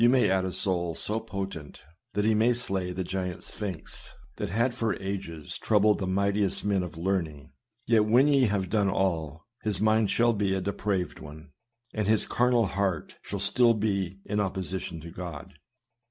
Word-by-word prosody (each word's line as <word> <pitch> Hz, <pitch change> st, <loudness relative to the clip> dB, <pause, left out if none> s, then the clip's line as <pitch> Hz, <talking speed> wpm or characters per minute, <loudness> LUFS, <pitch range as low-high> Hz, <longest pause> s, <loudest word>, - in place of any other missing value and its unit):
may 125 Hz, -6 st, +4 dB
add 95 Hz, -1 st, +2 dB
a 95 Hz, -, -2 dB
soul 85 Hz, -3 st, +1 dB
so 110 Hz, +2 st, -1 dB
potent, 95 Hz, -8 st, -6 dB, 0.3 s
that 105 Hz, +2 st, 0 dB
he 110 Hz, -, +4 dB
may 115 Hz, +3 st, +4 dB
slay 95 Hz, -6 st, 0 dB
the 90 Hz, +1 st, -3 dB
giant 90 Hz, -1 st, -4 dB
Sphinx, 95 Hz, -6 st, -6 dB, 0.3 s
that -, -, -3 dB
had 115 Hz, +6 st, +1 dB
for 115 Hz, -4 st, -1 dB
ages 95 Hz, -6 st, -5 dB
troubled 105 Hz, -1 st, +3 dB
the 95 Hz, -, -2 dB
mightiest 100 Hz, +1 st, 0 dB
men 100 Hz, -2 st, +2 dB
of 85 Hz, -2 st, -6 dB
learning; 80 Hz, -5 st, -2 dB, 0.3 s
yet, 110 Hz, -2 st, +4 dB
when 120 Hz, +6 st, +5 dB
ye 140 Hz, -3 st, +4 dB
have 100 Hz, -3 st, 0 dB
done 100 Hz, 0 st, +2 dB
all, 85 Hz, -5 st, -1 dB, 0.2 s
his 105 Hz, -4 st, +1 dB
mind 110 Hz, 0 st, +3 dB
shall 120 Hz, +3 st, +3 dB
be 100 Hz, -2 st, 0 dB
a -, -, 0 dB
depraved 100 Hz, -1 st, -2 dB
one, 75 Hz, 0 st, -11 dB, 0.4 s
and 105 Hz, -2 st, -1 dB
his 110 Hz, 0 st, +3 dB
carnal 120 Hz, -2 st, +2 dB
heart 95 Hz, -4 st, -2 dB
shall 100 Hz, -, -5 dB
still 115 Hz, +5 st, +4 dB
be 100 Hz, -3 st, -1 dB
in 105 Hz, -, -1 dB
opposition 95 Hz, -3 st, -3 dB
to 85 Hz, +1 st, -9 dB
God. 85 Hz, -4 st, -7 dB
100 Hz, 175 wpm, -28 LUFS, 90-110 Hz, 0.4 s, when